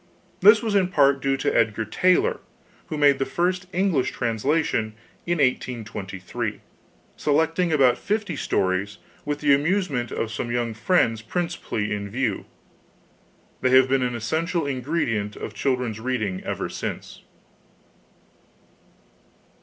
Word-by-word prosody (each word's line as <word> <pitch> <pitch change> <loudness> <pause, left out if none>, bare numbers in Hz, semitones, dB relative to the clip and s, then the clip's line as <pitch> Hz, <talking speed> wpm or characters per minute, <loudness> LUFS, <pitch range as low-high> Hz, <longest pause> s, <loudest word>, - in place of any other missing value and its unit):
This 210 +4 +7
was 220 -2 -1
in 195 -3 +3
part 140 -6 +3
due 135 0 +1
to - - -1
Edgar 110 -1 +1
Taylor, 185 - +2 0.5
who 155 - -4
made 145 -2 +4
the - - +2
first 180 +6 -1
English 180 -8 +1
translation 115 -1 -1 0.3
in 175 0 +1
1823, 110 - -2 0.5
selecting 160 +4 +1
about 130 -5 +4
fifty 210 +1 -2
stories 95 +2 -1 0.3
'with 145 0 -3
the 145 -2 +5
amusement 145 - 0
of 115 - -3
some 115 +2 -4
young 120 -1 -1
friends 115 -3 +1
principally 165 -7 -3
in 100 0 -4
view.' 130 +5 -2 1.1
They 130 - +2
have 130 0 +5
been 135 0 +2
an 125 -1 -1
essential 160 +8 -1
ingredient 125 -7 -2
of - - -7
children's 125 -5 -1
reading 110 -6 -2
ever - - -3
since. - - -6
135 Hz, 125 wpm, -24 LUFS, 115-165 Hz, 1.1 s, This